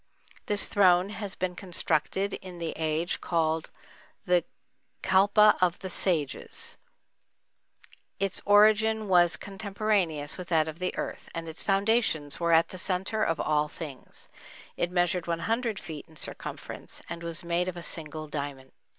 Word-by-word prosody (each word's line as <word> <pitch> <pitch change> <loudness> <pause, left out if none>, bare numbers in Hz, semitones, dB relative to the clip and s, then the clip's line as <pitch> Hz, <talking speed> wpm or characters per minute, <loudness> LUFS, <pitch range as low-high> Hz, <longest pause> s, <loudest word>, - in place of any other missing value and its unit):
This 205 0 +4
throne 185 -1 +4
had 205 -3 -4
been 185 -1 -1
constructed 185 +2 0
in 185 -2 -8
the 165 -1 -3
age 160 +2 -1
called 160 -2 0 0.6
the 180 -1 +3 0.6
"Kalpa 205 +3 +5
of 180 -1 +3
the 190 -1 -6
Sages"; 160 -8 -1 1.4
its 195 -1 +1
origin 215 +1 +4
was 175 -2 +4
contemporaneous 195 -7 -1
with 180 - -6
that 160 -3 +2
of 160 +1 -7
the 185 0 -2
earth, - - -5
and 165 0 -4
its 160 +1 -4
foundations 195 -7 +1
were 170 -1 +1
at 165 0 +5
the 185 - -7
centre 190 +4 -1
of 165 -2 0
all 150 0 +1
things; 150 -4 -9 0.5
it 175 - 0
measured 175 -1 +1
one 170 -1 -1
hundred 225 +1 -1
feet 155 -3 -8
in 160 - -19
circumference, - - -5
and 170 0 -6
was 170 +1 -2
made 170 +1 0
of 180 -1 -4
a 170 - -7
single 155 -1 -2
diamond. 140 -3 -5
175 Hz, 150 wpm, -28 LUFS, 160-195 Hz, 1.4 s, Kalpa